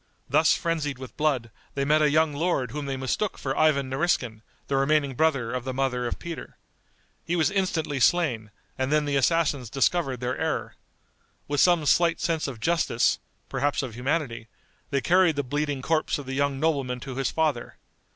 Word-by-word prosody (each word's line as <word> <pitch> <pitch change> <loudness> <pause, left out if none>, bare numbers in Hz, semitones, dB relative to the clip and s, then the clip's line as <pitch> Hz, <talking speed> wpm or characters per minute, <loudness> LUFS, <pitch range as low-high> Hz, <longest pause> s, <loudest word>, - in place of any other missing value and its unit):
Thus - - +4
frenzied 160 -5 -2
with 130 0 -10
blood, 135 -7 0 0.2
they 140 0 0
met 155 +2 +3
a 150 - +4
young 155 0 +2
lord 145 -4 -1
whom 145 -1 -5
they 135 -1 -2
mistook 130 +10 -2
for 135 -1 -3
Ivan 150 -4 +3
Nariskin, 130 -6 -1 0.2
the 140 - -1
remaining 140 0 +2
brother 135 -5 +1
of 125 -1 -2
the 130 0 -4
mother 125 -2 0
of - - -3
Peter. 170 -1 -8 0.7
He 175 - -1
was 170 +2 +2
instantly 175 -7 -1
slain, 125 -7 +2 0.3
and 130 +1 0
then 150 -1 +2
the 145 -1 -1
assassins 140 -3 +1
discovered 135 0 +1
their 125 +1 -2
error. 160 -1 -2 0.7
With 145 0 -1
some 175 -2 +4
slight 170 +2 +3
sense 160 -2 -1
of 130 -5 -6
justice, 160 -4 +1 0.3
perhaps 145 0 -1
of 125 -4 -5
humanity, 125 -2 -2 0.4
they 140 -1 0
carried 180 -1 +4
the 145 - -1
bleeding 145 0 -2
corpse 160 +1 +1
of 145 - -7
the 135 - -5
young 140 0 0
nobleman 135 -5 0
to 135 0 -6
his 135 -2 0
father. 155 -7 -1
145 Hz, 180 wpm, -26 LUFS, 130-160 Hz, 0.7 s, Thus